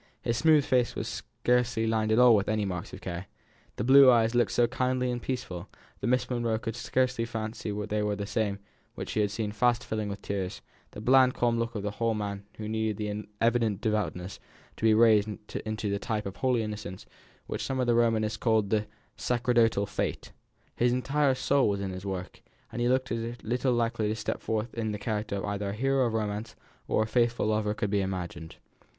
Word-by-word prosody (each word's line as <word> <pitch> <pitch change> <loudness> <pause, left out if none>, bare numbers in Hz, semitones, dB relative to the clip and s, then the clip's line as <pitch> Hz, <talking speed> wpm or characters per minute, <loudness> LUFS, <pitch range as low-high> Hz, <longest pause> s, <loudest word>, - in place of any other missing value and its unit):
His 115 - 0
smooth 150 +4 +4
fair 130 -3 +4
face 120 - -2
was - - -3
scarcely 125 -2 0
lined 110 -1 +1
at 110 - +3
all 125 -2 +7
with 100 -1 +1
any 110 -1 +1
marks 90 -3 -4
of - - -9
care; 90 +1 -5 0.5
the - - -3
blue 135 +2 +8
eyes 115 -2 +4
looked 120 0 +3
so 120 - +4
kindly 130 0 0
and 120 0 -3
peaceful, 105 -9 -4 0.3
that - - -2
Miss 125 +1 +2
Monro 120 -3 0
could 115 0 -5
scarcely 125 0 0
fancy 110 -1 -4 0.2
they 105 0 -1
were 105 0 0
the 100 0 -4
same 105 -2 -1 0.4
which - - -6
she - - -1
had 105 - +1
seen 105 0 -3
fast 120 +3 +2
filling 110 -1 -3
with 100 0 -6
tears; 95 -2 -4 0.3
the 105 - -9
bland 130 +2 +5
calm 120 -1 +1
look 115 0 -2
of 105 - -3
the 105 - -2
whole 115 +1 0
man 100 -1 -4
needed 110 -1 -2
the 105 -1 -3
ennoblement 105 +1 -4
of - - -29
his 105 +2 0
evident 115 -4 +1
devoutness 105 -4 -2 0.4
to - - -3
be 110 -1 +6
raised 110 -2 +5 0.4
into 110 -1 -2
the 100 - -1
type 110 -1 -2
of 100 0 -6
holy 125 -3 +1
innocence 105 -4 -6 0.4
which - - -4
some 135 -1 -2
of 125 - +2
the 120 - +3
Romanists 115 -2 +2
call 110 -2 +2
the 105 +1 0 0.3
"sacerdotal 120 -4 +2
face." - - -3 0.4
His 120 0 +2
entire 135 +2 +2
soul 135 -1 +2
was 100 -1 -1
in 100 -1 -3
his 95 +2 -6
work, 95 -2 -5 0.3
and 120 - -4
he 120 - +2
looked 130 0 +1
as 115 +1 -2
little 125 +3 0
likely 115 -2 0
to 110 - -1
step 110 - -3
forth 110 +1 -2
in 110 -2 -2
the - - -3
character 105 -1 -3
of 100 - -3
either 100 -1 -2
a - - -3
hero 135 +3 +2
of 115 - -3
romance 105 0 -3 0.3
or 110 - +2
a - - -2
faithful 120 +1 +1
lover 110 0 +1
as 105 - -1
could 105 -1 -2
be 100 -1 +2
imagined. 90 -4 -5
110 Hz, 220 wpm, -28 LUFS, 105-120 Hz, 0.5 s, blue